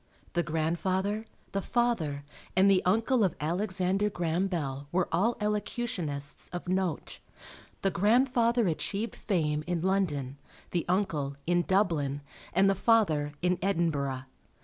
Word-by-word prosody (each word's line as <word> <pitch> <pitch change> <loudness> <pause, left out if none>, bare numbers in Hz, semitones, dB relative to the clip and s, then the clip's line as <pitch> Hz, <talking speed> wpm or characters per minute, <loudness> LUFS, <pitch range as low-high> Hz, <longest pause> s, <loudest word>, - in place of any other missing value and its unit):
The 175 - +2
grandfather, 185 +6 -1 0.3
the 195 - -1
father, 190 -13 0 0.3
and 190 +1 +6
the 185 - +4
uncle 225 +5 +3
of 185 - +1
Alexander 190 +4 0
Graham 175 0 0
Bell 145 -6 -3
were 180 0 +1
all 205 +8 +2
elocutionists 205 - -2
of 175 0 -6
note. 185 -3 -1 0.6
The 195 - +3
grandfather 235 +3 +3
achieved 200 +7 -2
fame 150 -6 0
in 175 -2 -1
London; 150 -8 0 0.3
the 175 -2 0
uncle, 155 -7 0
in 175 +1 +3
Dublin; 165 -8 +1 0.3
and 190 +3 +4
the 195 - +4
father, 180 -9 +2
in 180 -1 +2
Edinburgh. 155 -8 0
180 Hz, 125 wpm, -29 LUFS, 155-200 Hz, 0.6 s, and